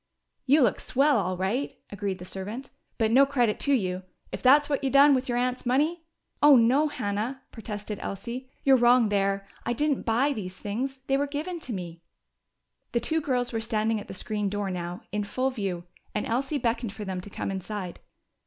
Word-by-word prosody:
"You 285 +2 +6
look 220 - +2
swell, 275 -1 +2
all 185 -1 -1
right," 205 +10 -1
agreed 200 -2 -3
the 180 - -9
servant. 205 +8 -6 0.3
"But 225 -2 +2
no 265 +4 +7
credit 245 -6 +1
to 280 - +2
you! 185 -5 -1 0.3
If - - -5
that's 290 +3 +6
what 280 -1 -1
you 270 - +1
done 280 +2 +7
with 260 -1 0
your 240 - +1
aunt's 250 +1 -1
money 305 +7 +1 0.2
" - - -48
"Oh, 295 -1 +8
no, 255 +6 +4
Hannah!" 235 0 -3
protested 210 -2 -6
Elsie. 240 +6 -5
"You're 270 -1 +6
wrong 240 -2 +5
there. 195 -1 0 0.2
I 240 - -1
didn't 295 +2 0
buy 250 +6 +2
these 185 -6 -6
things. 260 +6 -4
They 270 - +2
were 285 +1 0
given 310 +5 -4
to 255 -6 -5
me." 170 -3 -6 0.9
The 235 - +3
two 320 +7 0
girls 250 -4 -1
were 225 - -1
standing 220 -1 0
at - - -11
the - - -7
screen 210 +1 -2
door 205 -1 -2
now, 175 0 -5
in 210 +1 -1
full 255 +6 -1
view, 195 -8 -3 0.3
and 210 - -1
Elsie 270 +5 -1
beckoned 230 -4 -1
for 210 0 -7
them 185 -1 -3
to 205 - -10
come 195 - -4
inside. 190 -1 -5
235 Hz, 200 wpm, -27 LUFS, 200-270 Hz, 0.9 s, Oh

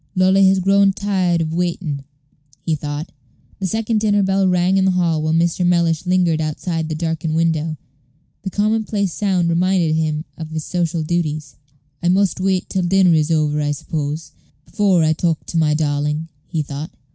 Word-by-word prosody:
"Lolly 190 +1 +4
has 190 0 +4
grown 195 +1 +3
tired 185 -4 0
of 160 0 -2
waiting," 170 -5 -2 0.6
he 165 - -2
thought. 150 +1 -4 0.5
The 190 - -1
second 220 +2 0
dinner 205 -1 +2
bell 195 0 +2
rang 180 +1 +2
in 190 - +3
the - - +4
hall 165 -3 +1
while 155 0 0
Mr. 170 +2 +1
Mellish 170 -1 +1
lingered 175 -3 +2
outside 160 +1 -3
this 155 - -3
darkened 160 -1 -2
window. 160 -1 0 0.6
The 195 - -4
commonplace 210 -2 0
sound 190 -4 0
reminded 170 -1 +2
him 155 0 -1
of 160 -1 -6
his 155 -1 -5
social 170 -2 -1
duties. 155 -3 -2 0.5
"I 175 - +1
must 190 +1 +2
wait 185 -1 0
till 190 - -1
dinner 180 0 +4
is 155 -1 +2
over, 150 -2 +1
I 145 0 0
suppose, 150 +2 -4 0.3
before 195 -5 +2
I 155 0 +3
talk 165 0 -1
to 170 - -4
my 150 -2 +2
darling," 150 +1 -1 0.2
he 160 -3 -2
thought. 145 +2 -6
170 Hz, 175 wpm, -19 LUFS, 155-190 Hz, 0.6 s, Lolly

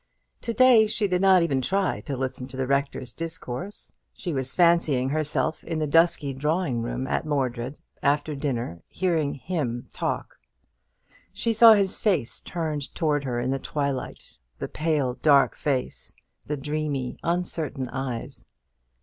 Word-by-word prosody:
To 235 - -2
day 235 -2 +6
she 210 0 0
did 180 -1 0
not 190 -2 +6
even 135 -6 +1
try 190 +7 0
to 140 -3 -2
listen 130 -1 -3
to 130 - -9
the 130 - 0
rector's 140 -2 -1
discourse. 165 +2 -5 0.2
She 175 -4 -4
was 130 -2 -1
fancying 170 -7 +3
herself 155 +1 0
in 165 -1 -3
the 155 - 0
dusky 150 -2 +3
drawing 150 -2 0
room 120 +3 -3
at - - -1
Mordred, 130 -3 -2 0.2
after 145 +2 +1
dinner, 120 - -3
hearing 165 -6 0
him 135 -6 -3
talk. - - -3 0.9
She 230 - -1
saw 225 +1 +9
his 200 -2 +2
face 180 - 0
turned 155 -5 -4
towards 145 -3 0
her 120 -2 -1
in 125 +2 -1
the 135 - -1
twilight 140 -2 -4 0.2
the - - -4
pale 150 -6 -1
dark 140 -3 +5
face 135 -4 -2 0.3
the 150 - -2
dreamy, 145 -2 -3
uncertain 165 -6 -2
eyes. 130 0 -5
145 Hz, 150 wpm, -25 LUFS, 130-170 Hz, 0.9 s, saw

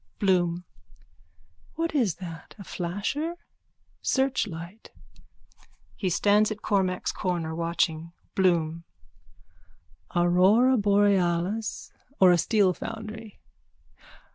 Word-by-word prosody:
_ - - -44
BLOOM: 180 -3 +1 1.1
What 330 0 -2
is 235 - +1
that? 165 -3 -10
A 200 - -9
flasher? 205 - -3 0.7
Searchlight. 220 -8 -2 1.1
(He 190 - -2
stands 205 +4 +3
at 215 -1 -6
Cormack's 190 -3 0
corner, 175 -4 -2
watching.) 165 -1 -1 0.2
BLOOM: 170 -3 +1 1.3
Aurora 185 +9 +4
borealis 200 -1 +1 0.3
or 185 -1 +7
a 175 - +4
steel 200 -1 +3
foundry? 220 0 -8
190 Hz, 90 wpm, -26 LUFS, 175-215 Hz, 1.3 s, or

